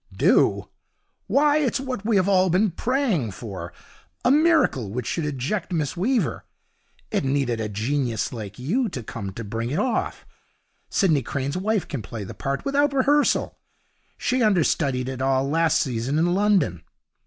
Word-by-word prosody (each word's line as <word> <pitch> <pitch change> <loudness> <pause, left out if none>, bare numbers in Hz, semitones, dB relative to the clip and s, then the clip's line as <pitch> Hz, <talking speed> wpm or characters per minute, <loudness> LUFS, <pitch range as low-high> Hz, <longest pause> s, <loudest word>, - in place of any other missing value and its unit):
'Do! - - +3 0.6
Why, 295 +1 +3
it's 280 -3 +1
what 260 -6 -4
we 220 0 +1
have 190 -1 +3
all 190 -1 +4
been 190 +4 +2
praying 225 - 0
for 95 -6 -7 0.5
a 245 - +5
miracle 305 - +3
which 120 +3 -4
should 160 +3 -2
eject 150 +8 -3
Miss 155 -4 -1
Weaver. 210 - 0 0.7
It - - 0
needed 135 -4 0
a 105 - -3
genius 115 +2 -1
like 105 -4 -7
you 215 - 0
to 125 -9 -6
come 100 -2 -6
to 115 - -6
bring 115 +3 -3
it 145 - -2
off. 225 +3 -1 0.6
Sidney 160 -9 +2
Crane's 140 +2 -3
wife 205 +2 0
can 140 - -4
play 105 +2 -7
the 95 - -8
part 140 0 -3
without 280 +1 +2
rehearsal. 285 +2 +2 0.6
She 255 0 0
understudied 155 - +2
it 130 -1 -5
all 135 0 +1
last 160 +2 +2
season 130 +2 -1
in 175 +2 +2
London. 190 - +2
155 Hz, 160 wpm, -24 LUFS, -, 0.7 s, a